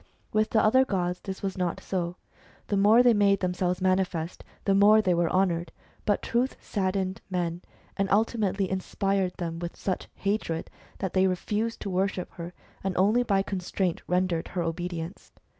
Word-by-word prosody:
With 215 Hz, 0 st, +2 dB
the 220 Hz, -, +3 dB
other 260 Hz, +5 st, +5 dB
gods 180 Hz, -6 st, -1 dB
this 190 Hz, 0 st, -7 dB
was 190 Hz, -1 st, -3 dB
not 180 Hz, -2 st, -1 dB
so; 175 Hz, -2 st, -3 dB, 0.5 s
the 205 Hz, -, +1 dB
more 210 Hz, +5 st, +6 dB
they 245 Hz, -1 st, +6 dB
made 200 Hz, -2 st, +3 dB
themselves 180 Hz, 0 st, 0 dB
manifest, 185 Hz, -3 st, 0 dB, 0.2 s
the 195 Hz, -, +3 dB
more 205 Hz, +2 st, +7 dB
they 190 Hz, -4 st, +2 dB
were 170 Hz, -1 st, +2 dB
honoured; 175 Hz, -3 st, +1 dB, 0.4 s
but 205 Hz, -, +2 dB
Truth 245 Hz, +3 st, 0 dB
saddened 190 Hz, -1 st, -2 dB
men, 175 Hz, -2 st, -2 dB, 0.4 s
and 195 Hz, 0 st, 0 dB
ultimately 205 Hz, -2 st, +1 dB
inspired 190 Hz, 0 st, -1 dB
them 165 Hz, -1 st, -4 dB
with 170 Hz, 0 st, -5 dB
such 185 Hz, -, -3 dB
hatred 195 Hz, -5 st, -2 dB, 0.3 s
that 190 Hz, -2 st, -3 dB
they 190 Hz, 0 st, +4 dB
refused 210 Hz, +5 st, -2 dB
to 200 Hz, -, -3 dB
worship 185 Hz, 0 st, -1 dB
her, 170 Hz, 0 st, -7 dB, 0.3 s
and 190 Hz, -1 st, -2 dB
only 210 Hz, +6 st, +4 dB
by 200 Hz, -5 st, +2 dB
constraint 185 Hz, -2 st, -2 dB
rendered 180 Hz, -2 st, 0 dB
her 175 Hz, -1 st, -2 dB
obedience. 170 Hz, +1 st, -5 dB
190 Hz, 165 wpm, -27 LUFS, 180-200 Hz, 0.5 s, more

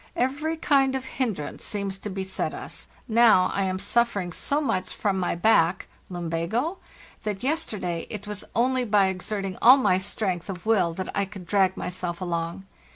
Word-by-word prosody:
* -, -, -36 dB, 0.2 s
Every 315 Hz, +3 st, -3 dB
kind 270 Hz, -4 st, +3 dB
of 260 Hz, -1 st, -3 dB
hinderance 225 Hz, -, -3 dB
seems 200 Hz, -2 st, -3 dB
to 210 Hz, -, -5 dB
beset 190 Hz, 0 st, -3 dB
us: -, -, -7 dB, 0.2 s
now 220 Hz, -5 st, +5 dB
I 195 Hz, -, +1 dB
am 185 Hz, 0 st, -1 dB
suffering 200 Hz, -3 st, 0 dB
so 285 Hz, -, 0 dB
much 190 Hz, -11 st, -1 dB
from 195 Hz, -2 st, 0 dB
my 180 Hz, -, 0 dB
back 175 Hz, -2 st, +3 dB, 0.2 s
(lumbago 175 Hz, -, -2 dB, 0.2 s
?) -, -, -22 dB
that 210 Hz, -1 st, -3 dB
yesterday 210 Hz, -, -2 dB
it 210 Hz, -1 st, -6 dB
was 210 Hz, 0 st, -6 dB
only 255 Hz, +2 st, +2 dB
by 205 Hz, -4 st, +3 dB
exerting 190 Hz, 0 st, -4 dB
all 255 Hz, +4 st, +9 dB
my 200 Hz, -8 st, +3 dB
strength 190 Hz, -2 st, -2 dB
of 180 Hz, -1 st, -6 dB
will 205 Hz, -6 st, +3 dB
that 185 Hz, +1 st, -5 dB
I 200 Hz, -, +1 dB
could 190 Hz, -2 st, -10 dB
drag 190 Hz, +1 st, +2 dB
myself 180 Hz, -1 st, -4 dB
along. 170 Hz, +1 st, -3 dB
195 Hz, 175 wpm, -26 LUFS, 185-235 Hz, 0.2 s, all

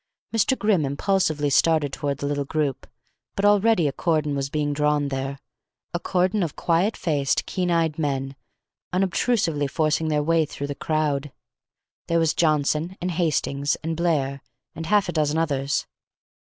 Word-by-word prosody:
Mr. 230 Hz, +4 st, +2 dB
Grimm 210 Hz, -7 st, +2 dB
impulsively 150 Hz, 0 st, 0 dB
started 155 Hz, -1 st, +3 dB
toward 140 Hz, -2 st, -2 dB
the 145 Hz, -, -5 dB
little 145 Hz, 0 st, -1 dB
group, 140 Hz, -2 st, -2 dB, 0.5 s
but 200 Hz, -, 0 dB
already 205 Hz, -4 st, +4 dB
a -, -, 0 dB
cordon 155 Hz, -2 st, 0 dB
was 140 Hz, 0 st, -2 dB
being 145 Hz, 0 st, -1 dB
drawn 150 Hz, -1 st, +1 dB
there 135 Hz, 0 st, -3 dB, 0.6 s
a 175 Hz, -, -1 dB
cordon 185 Hz, +3 st, +1 dB
of 165 Hz, -5 st, -2 dB
quiet 175 Hz, +6 st, +1 dB
faced, 145 Hz, -5 st, 0 dB
keen 180 Hz, -1 st, -2 dB
eyed 165 Hz, -2 st, +1 dB
men, 135 Hz, -2 st, -2 dB, 0.6 s
unobstrusively 180 Hz, -, +1 dB
forcing 155 Hz, +2 st, 0 dB
their 150 Hz, -1 st, +1 dB
way 165 Hz, +1 st, +3 dB
through 145 Hz, -1 st, -5 dB
the 145 Hz, -, -3 dB
crowd. 150 Hz, -2 st, -1 dB, 0.8 s
There 170 Hz, -, +1 dB
was 165 Hz, -2 st, +2 dB
Johnson, 155 Hz, +3 st, +1 dB
and 180 Hz, +1 st, -2 dB
Hastings, 150 Hz, -4 st, 0 dB
and 165 Hz, +1 st, -2 dB
Blair, 145 Hz, -5 st, 0 dB, 0.3 s
and 160 Hz, +1 st, -6 dB
half 205 Hz, 0 st, +3 dB
a -, -, -1 dB
dozen 155 Hz, -1 st, +1 dB
others. 140 Hz, -3 st, 0 dB
155 Hz, 155 wpm, -24 LUFS, 145-175 Hz, 0.8 s, already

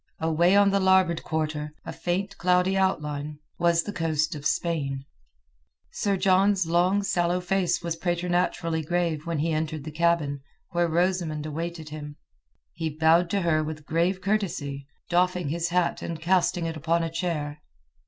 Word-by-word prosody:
Away 165 Hz, +3 st, +3 dB
on 200 Hz, 0 st, +5 dB
the 200 Hz, -, +2 dB
larboard 190 Hz, -3 st, +3 dB
quarter, 150 Hz, -1 st, -3 dB
a -, -, -5 dB
faint 190 Hz, +3 st, -2 dB
cloudy 180 Hz, +1 st, +3 dB
outline, 150 Hz, -6 st, -1 dB, 0.2 s
was 170 Hz, -1 st, +3 dB
the 205 Hz, -, -5 dB
coast 160 Hz, -1 st, 0 dB
of 145 Hz, -2 st, -2 dB
Spain. 140 Hz, -5 st, -1 dB, 0.9 s
Sir 200 Hz, -2 st, 0 dB
John's 190 Hz, 0 st, +3 dB
long 180 Hz, +4 st, +2 dB
sallow 175 Hz, -2 st, +1 dB
face 180 Hz, -1 st, 0 dB
was 170 Hz, -1 st, -2 dB
preternaturally 175 Hz, -1 st, 0 dB
grave 165 Hz, -1 st, -1 dB
when 170 Hz, -1 st, -1 dB
he 160 Hz, +3 st, 0 dB
entered 155 Hz, -1 st, -2 dB
the 155 Hz, -, -6 dB
cabin, 155 Hz, -3 st, +1 dB, 0.3 s
where 175 Hz, 0 st, +2 dB
Rosamund 170 Hz, -2 st, 0 dB
awaited 160 Hz, +1 st, -5 dB
him. 150 Hz, -1 st, -7 dB, 0.6 s
He 160 Hz, -, -3 dB
bowed 165 Hz, +2 st, +4 dB
to 200 Hz, +2 st, 0 dB
her 155 Hz, -3 st, +2 dB
with 155 Hz, 0 st, -5 dB
a -, -, -22 dB
grave 170 Hz, +5 st, 0 dB
courtesy, 160 Hz, -9 st, -2 dB, 0.2 s
doffing 180 Hz, -2 st, +1 dB
his 170 Hz, +2 st, -1 dB
hat 180 Hz, 0 st, +1 dB
and 165 Hz, -2 st, -5 dB
casting 175 Hz, 0 st, +1 dB
it 165 Hz, -1 st, -3 dB
upon 165 Hz, +2 st, 0 dB
a 165 Hz, -, -3 dB
chair. 155 Hz, -4 st, -3 dB
170 Hz, 160 wpm, -26 LUFS, 155-180 Hz, 0.9 s, on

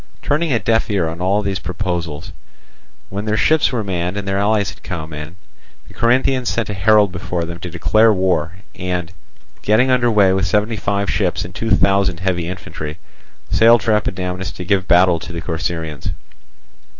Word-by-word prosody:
Turning 155 Hz, +2 st, 0 dB
a 120 Hz, -, +3 dB
deaf 115 Hz, 0 st, +1 dB
ear 100 Hz, -5 st, +1 dB
to 80 Hz, +1 st, -5 dB
all 100 Hz, +3 st, +1 dB
these 95 Hz, -2 st, -2 dB
proposals, 85 Hz, -2 st, -4 dB, 0.8 s
when 100 Hz, +2 st, -4 dB
their 110 Hz, 0 st, 0 dB
ships 155 Hz, +10 st, +3 dB
were 120 Hz, -4 st, -1 dB
manned 90 Hz, -1 st, -2 dB
and 100 Hz, -1 st, -4 dB
their 95 Hz, 0 st, 0 dB
allies 105 Hz, 0 st, +1 dB
had -, -, -17 dB
come 80 Hz, -3 st, -6 dB
in, 75 Hz, +2 st, -7 dB, 0.5 s
the -, -, -15 dB
Corinthians 125 Hz, +2 st, +1 dB
sent 115 Hz, -3 st, -1 dB
a -, -, -3 dB
herald 105 Hz, 0 st, +4 dB
before 90 Hz, -1 st, -3 dB
them 85 Hz, 0 st, -7 dB
to 90 Hz, -, -6 dB
declare 110 Hz, +6 st, +3 dB
war 90 Hz, -4 st, 0 dB, 0.2 s
and, 90 Hz, -2 st, -3 dB, 0.5 s
getting 120 Hz, +5 st, +3 dB
under 125 Hz, -1 st, +3 dB
way 100 Hz, -4 st, +4 dB
with 95 Hz, -2 st, 0 dB
seventy 105 Hz, +4 st, +1 dB
five 100 Hz, 0 st, -1 dB
ships 90 Hz, -3 st, 0 dB
and 90 Hz, -, -9 dB
two 115 Hz, +4 st, -3 dB
thousand 95 Hz, -3 st, +2 dB
heavy 90 Hz, -3 st, -1 dB
infantry, 80 Hz, -4 st, -6 dB, 0.5 s
sailed 115 Hz, -1 st, +5 dB
for 115 Hz, -, +1 dB
Epidamnus 90 Hz, -3 st, -2 dB
to 90 Hz, 0 st, -8 dB
give 95 Hz, 0 st, +1 dB
battle 90 Hz, -1 st, +4 dB
to 85 Hz, -, -8 dB
the 85 Hz, -, -5 dB
Corcyraeans. 80 Hz, -2 st, -4 dB
95 Hz, 180 wpm, -18 LUFS, 85-105 Hz, 0.8 s, sailed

